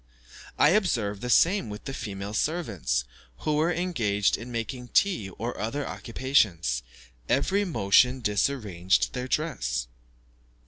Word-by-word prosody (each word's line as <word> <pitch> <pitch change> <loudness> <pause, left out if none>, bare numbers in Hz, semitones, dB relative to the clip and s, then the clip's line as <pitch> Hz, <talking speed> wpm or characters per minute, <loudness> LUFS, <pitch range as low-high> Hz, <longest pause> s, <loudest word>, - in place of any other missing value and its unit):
I 150 - +6
observed 120 - +1
the 125 - -4
same 170 - +4
with 105 0 -8
the 135 - -4
female 100 -4 -5
servants, 110 - -1 0.4
who 150 -1 0
were 160 +3 +2
engaged 120 - +1
in 120 +3 -8
making 120 +2 -4
tea 150 - +1
or 120 +3 -3
other 135 +7 -2
occupations; 105 - 0 0.5
every 195 +10 +2
motion 125 - +3
disarranged 105 -5 +1
their 125 0 -3
dress. 95 - -1
120 Hz, 125 wpm, -27 LUFS, 100-150 Hz, 0.5 s, I